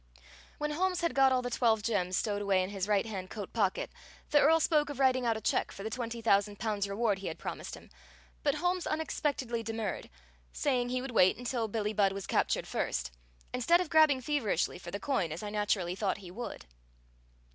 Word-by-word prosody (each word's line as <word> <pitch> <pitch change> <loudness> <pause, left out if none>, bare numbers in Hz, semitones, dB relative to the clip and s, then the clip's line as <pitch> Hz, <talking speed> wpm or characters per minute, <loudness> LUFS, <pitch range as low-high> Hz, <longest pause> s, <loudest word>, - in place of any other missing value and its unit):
When 300 0 -2
Holmes 365 +3 0
had 335 - 0
got 270 -1 +5
all 255 -1 +2
the 245 - -3
twelve 225 -3 +2
gems 185 -5 0
stowed 205 -2 -1
away 195 -2 +2
in 185 - -5
his 195 -1 -3
right 205 -1 +2
hand 190 -4 -5
coat 205 -3 -7
pocket, 200 -5 0 0.4
the 295 - +6
Earl 320 +3 +5
spoke 300 -2 +2
of 285 -2 -6
writing 255 -2 +3
out 225 -1 +2
a - - -7
check - - 0
for 195 - -8
the 220 - -4
twenty 235 -1 -4
thousand 205 -1 +3
pounds' 205 -3 -1
reward 205 -1 0
he 195 - -5
had 160 - -4
promised - - -6
him, - - -15 0.5
but - - +1
Holmes 355 0 0
unexpectedly 285 -6 -1
demurred, 225 -3 -4 0.4
saying 250 -3 0
he 255 0 -1
would 270 - -5
wait 185 -5 +4
until 240 -2 -2
Billie 215 0 -2
Budd 200 -2 +3
was 195 -1 -5
captured - - +1
first, 65 - -2 0.4
instead 295 +8 +4
of 360 - -3
grabbing 310 -5 +5
feverishly 265 -10 0
for 175 - -8
the 200 - -4
coin, 195 - 0
as 165 +6 -5
I 205 - -4
naturally 205 -4 0
thought 195 +1 -1
he 185 -3 -10
would. 235 +6 -7
225 Hz, 210 wpm, -31 LUFS, 200-265 Hz, 0.5 s, the